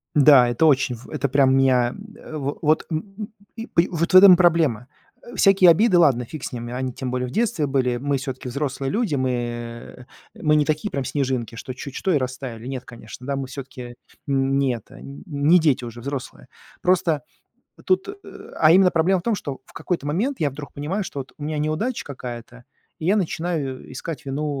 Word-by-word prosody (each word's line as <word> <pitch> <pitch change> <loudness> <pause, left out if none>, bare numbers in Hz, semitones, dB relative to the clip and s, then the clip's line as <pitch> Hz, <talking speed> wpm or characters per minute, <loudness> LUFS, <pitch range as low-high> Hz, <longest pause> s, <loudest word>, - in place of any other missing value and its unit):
Н-да, 140 -4 +7
это 120 +7 +1
очень 130 -4 +3
в 120 - -14
это 140 - -1
прям 135 0 +3
меня, 130 -2 +3
ам, - - -10 0.2
э, 155 - -9
в 140 -1 -3
вот, 155 0 +2
м, 170 +5 -5
м, 210 -1 -5 0.3
и 225 0 -7
по 170 - +3
и 175 - -2
вот 170 +1 -2
в - - +5
этом 185 0 +10
и - - +5
проблема. 160 -10 +2 0.4
Э, 240 - -11
всякие 195 -2 +6
обиды, 185 +3 +5
ладно, 140 -8 +4
фиг 150 +4 -9
с - - -5
ними. 120 -1 -6
Они, 130 0 -3
тем 125 0 -5
более, 125 0 -2
в - - -8
детстве 220 - 0
были. 130 -3 0
Мы 140 +3 -1
всё-таки 130 -1 -6
взрослые 135 +1 -3
люди, 215 -7 0
мы, 130 -1 0
э, 120 0 -5 0.4
мы 155 -1 +3
не 150 - +4
такие 155 +7 -1
прям 140 - -2
снежинки, 130 -5 -2
что 130 +2 -7
чуть 130 +1 -9
что 190 - 0
и - - +4
растаяли. 130 -3 -5
Нет, 130 -2 -5
конечно, 120 +1 -11
да, 140 - -1
мы 135 -1 -4
всё-таки 130 -2 -9 0.3
нь 135 0 +1
не 135 -2 +2
это, 115 - -12
не 145 +3 +1
дети 150 -6 +2
уже, 120 0 -8
взрослые. 140 +1 -6 0.3
Просто 170 -5 +1 0.6
тут, 375 0 +1
э, 400 - -6 0.4
а 155 0 +6
именно 185 +1 +6
проблема 180 +3 +2
в - - -11
том, 230 +1 +1
что 140 -8 -6
в - - -20
какой-то 170 -5 -3
момент 225 - -1
я 150 - +1
вдруг 145 +1 -9
понимаю, 165 +9 -3
что 145 - -6
вот 135 - -8
у 145 - -8
меня 155 +1 -3
неудача 155 +12 -2
какая-то, 125 -2 -8 0.4
и 155 - -5
я 195 +4 +3
начинаю 160 -9 -3
искать 150 +4 -7
вину 140 +3 -2
140 Hz, 215 wpm, -22 LUFS, 130-165 Hz, 0.6 s, этом